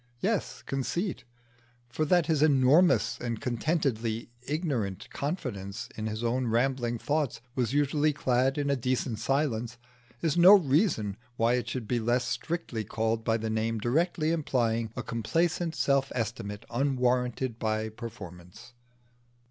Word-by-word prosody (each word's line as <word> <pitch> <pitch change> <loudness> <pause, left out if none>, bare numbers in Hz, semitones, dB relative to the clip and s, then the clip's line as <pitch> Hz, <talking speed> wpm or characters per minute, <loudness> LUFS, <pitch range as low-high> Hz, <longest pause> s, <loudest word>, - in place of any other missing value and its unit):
Yes, 205 - -1
conceit; 135 +2 -2 0.6
for 140 +6 -1
that 175 +1 +3
his 155 -2 +1
enormous 150 +4 +4
and 115 -2 -3
contentedly 120 -4 -1 0.2
ignorant 135 - -2
confidence 120 - -4
in 110 0 -3
his 110 +1 -4
own 125 +2 0
rambling 120 0 +1
thoughts 145 +1 -1
was 125 -3 0
usually 145 +1 +2
clad 130 -1 +1
in 145 -1 0
a - - +3
decent 125 -3 -1
silence, 120 -2 -1 0.4
is 155 0 0
no 175 +3 +9
reason 140 - +2 0.2
why 115 +1 +3
it 120 -2 -1
should 120 -3 -4
be 120 +1 +1
less 120 +2 +1
strictly 160 -10 -3
called 110 +2 -1
by 115 0 +2
the 110 0 -3
name 110 +1 0
directly 155 - +1
implying 115 -8 0
a 125 - -4
complacent 165 +9 -1
self 140 -2 +1
estimate 110 -3 -4
unwarranted 125 -2 0
by 110 -1 -1
performance. 110 -2 -10
125 Hz, 135 wpm, -29 LUFS, 115-145 Hz, 0.6 s, no